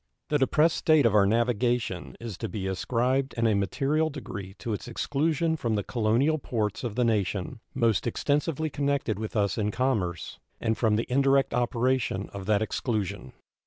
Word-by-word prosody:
The 150 - +2
depressed 155 +4 +3
state 155 -4 +4
of 115 - +4
our 100 -2 +5
navigation 120 -3 0
is 115 -4 -6
to - - -3
be 100 -3 -4
ascribed 125 +7 0
in 115 - 0
a 110 - +4
material 135 - +1
degree 100 -10 -7
to 115 - -4
its 105 - -5
exclusion 155 +6 0
from 115 -8 -1
the 105 - -1
colonial 120 +9 +1
ports 110 -5 -2
of 115 -4 -3
the 125 - +2
nation 105 +1 -1 0.2
most 115 -4 +2
extensively 150 +5 0
connected 140 -7 -1
with 110 +1 -5
us 100 -1 +1
in 105 -1 +1
commerce, 105 -8 -1 0.2
and 110 - 0
from 110 -2 +2
the 115 - 0
indirect 135 +1 +3
operation 120 -4 0
of 100 -1 -7
that 105 0 +3
exclusion. 100 - -3
115 Hz, 170 wpm, -27 LUFS, 105-135 Hz, 0.2 s, our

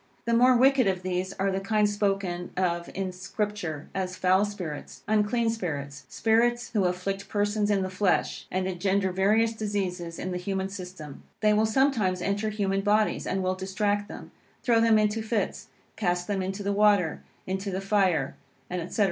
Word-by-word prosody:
The 235 - +1
more 250 +2 +6
wicked 260 -2 +5
of 185 -1 0
these 185 +1 -2
are 195 +1 0
the 190 - -1
kind 210 +1 +2
spoken 195 -4 -1
of 175 -2 0
in 190 0 -2
Scripture, 185 -4 -4
as 185 -1 -2
"foul 185 +3 +3
spirits," 180 -8 -7
"unclean 215 +2 +2
spirits," 145 - -5
spirits 240 +2 +1
who 205 -4 +2
afflict 185 +2 -2
persons 205 0 0
in 200 -2 +2
the 185 - -2
flesh, 185 -1 0
and 185 0 -1
engender 190 +1 0
various 215 +5 +2
diseases 190 -6 -3
in 185 - -4
the 180 - -2
human 190 +1 -2
system. 180 -7 -8 0.2
They 210 -1 +4
will 215 +1 +3
sometimes 220 -7 +2
enter 200 +4 -1
human 195 -2 0
bodies, 210 +1 +1
and 190 0 -1
will 185 0 +1
distract 205 +2 -1
them, - - -10 0.3
throw 230 -2 +4
them 225 -1 +5
into 215 +1 +1
fits, 220 0 -2 0.3
cast 175 -3 0
them 200 -1 -1
into 195 +2 -3
the 200 0 0
water, 200 -5 +3 0.2
into 190 +2 -3
the 190 0 -2
fire, 195 -8 +1 0.5
&c. - - -8
195 Hz, 175 wpm, -27 LUFS, 185-210 Hz, 0.5 s, more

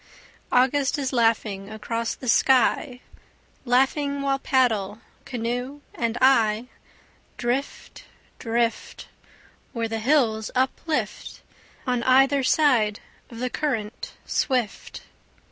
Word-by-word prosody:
August 265 +3 +2
is 270 -2 -3
laughing 220 -4 0
across 225 +1 -3
the 255 - -9
sky, 255 +1 +2 0.6
Laughing 275 +3 +1
while 275 -1 0
paddle, 220 -7 +1 0.3
canoe 245 +3 -4
and 235 0 -2
I, 235 -3 +3 0.7
Drift, 245 +4 -4 0.3
drift, 230 0 -2 0.6
Where 230 -2 -2
the 225 0 -3
hills 225 -4 +1
uplift 265 +5 -2 0.4
On 250 -2 0
either 270 +3 +4
side 250 -7 +2 0.3
of 230 - -11
the 250 +1 -3
current 230 -7 -3
swift. 250 -6 -2
245 Hz, 95 wpm, -24 LUFS, 225-270 Hz, 0.7 s, either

